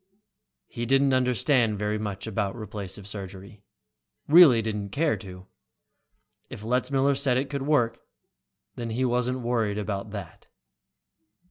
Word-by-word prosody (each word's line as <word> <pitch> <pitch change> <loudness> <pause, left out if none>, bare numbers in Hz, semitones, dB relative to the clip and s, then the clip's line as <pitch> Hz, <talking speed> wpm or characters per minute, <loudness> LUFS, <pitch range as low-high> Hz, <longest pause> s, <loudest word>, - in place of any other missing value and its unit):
He 120 0 -5
didn't 135 +1 +3
understand 125 -2 +2
very 105 +1 -1
much 100 -2 -4
about 105 -2 -2
replacive 100 -3 -7
surgery, 100 0 -9 0.7
really 145 -8 +7
didn't 105 -2 -3
care 155 +8 +1
to. 90 -2 -11 1.0
If 105 - -9
Letzmiller 130 +4 +1
said 135 -2 +1
it 135 +2 -2
could 140 -1 -3
work, 120 -6 +2 0.7
then 120 -1 -5
he 125 +4 -1
wasn't 125 +1 0
worried 115 -4 0
about 105 0 -3
that. 100 -2 -9
115 Hz, 125 wpm, -26 LUFS, 105-130 Hz, 1.0 s, really